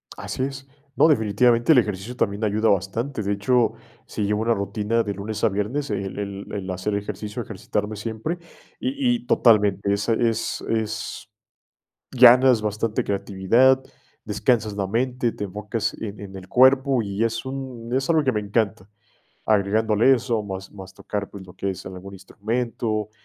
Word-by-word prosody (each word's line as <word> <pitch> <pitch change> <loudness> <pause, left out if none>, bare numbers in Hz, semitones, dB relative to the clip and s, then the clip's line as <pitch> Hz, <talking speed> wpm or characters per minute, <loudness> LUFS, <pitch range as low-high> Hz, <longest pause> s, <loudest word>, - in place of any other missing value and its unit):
Así 130 - -4
es. 135 0 -5 0.3
No, - - +5
definitivamente, 120 0 +3
el - - +4
ejercicio 105 0 0
también 100 -3 -1
ayuda 110 +1 +2
bastante, 110 +7 -1
de 100 -1 -2
hecho, 115 +4 +2 0.3
sí - - -3
llevo 105 +1 0
una 115 +1 +2
rutina 105 +3 -1
de 105 -2 -3
lunes 100 +2 -5
a - - +5
viernes, 110 +9 -2
el 95 0 -3
el 100 -1 -6
el 100 -2 -5
hacer 95 +3 -2
ejercicio, 105 0 -4
ejercitarme 105 +1 -4
siempre, 115 - -4 0.4
y 265 -1 0
y 240 0 -7
totalmente, 100 -3 +3
esa 105 +3 0
es 115 -1 0
es 110 -1 -3 0.8
ganas 125 -1 +7
bastante 105 +1 -1
creatividad, 100 +7 +3 0.4
descansas 110 -4 +1
la 100 -2 -2
mente, 120 +3 0
te 105 - -5
enfocas 105 +3 -3
en 105 -2 -6
en 95 -1 -9
el 95 -1 -10
cuerpo, 130 0 +4
y 100 +1 -2
es 115 +1 -2
un 130 -3 -6
es 135 +3 -1
algo 160 -2 +3
que 130 - +2
me 105 - -1
encanta, 100 -2 -1 0.6
agregándole 110 +3 +3
eso, 120 -3 0
más 95 -1 -7
más 95 -2 -11
tocar, 100 +1 -5
pues, 95 -2 -10
lo 90 - -14
que 100 - -2
es 95 - -8
algún 95 +1 -9
instrumento, 110 +2 -3
110 Hz, 165 wpm, -23 LUFS, 100-120 Hz, 0.8 s, ganas